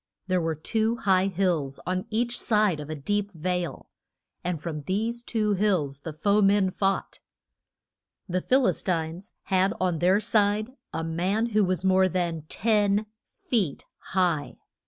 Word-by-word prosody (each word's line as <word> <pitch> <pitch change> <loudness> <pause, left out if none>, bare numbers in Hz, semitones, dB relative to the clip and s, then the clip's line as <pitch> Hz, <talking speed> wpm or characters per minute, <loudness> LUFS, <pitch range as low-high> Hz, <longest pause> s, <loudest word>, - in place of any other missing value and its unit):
There 185 -2 +1
were 165 -1 -1
two 220 +8 0
high 190 -4 +2
hills 175 -8 -1
on 185 0 -2
each 240 +2 0
side 210 -7 +2
of 150 0 -7
a 155 - -3
deep 205 +8 -1
vale, 175 -2 -3 0.5
and 175 -2 -2
from 150 -1 -5
these 220 +9 -2
two 215 -3 0
hills 180 -9 0
the 160 +3 -6
foe 200 +7 +2
men 195 -1 +3
fought. 195 +1 -1 1.1
The 185 0 -1
Phil 260 +5 +3
is - - +1
tines 170 0 -3
had 190 +1 +1
on 180 -3 0
their 185 +4 +4
side 215 +1 +1 0.2
a 165 - -3
man 185 +8 0
who 215 -2 +3
was 185 0 -1
more 190 0 +4
than 170 -3 -2
ten 210 -1 +2 0.2
feet 200 - -2
high. 175 -7 -1
185 Hz, 155 wpm, -26 LUFS, 170-210 Hz, 1.1 s, their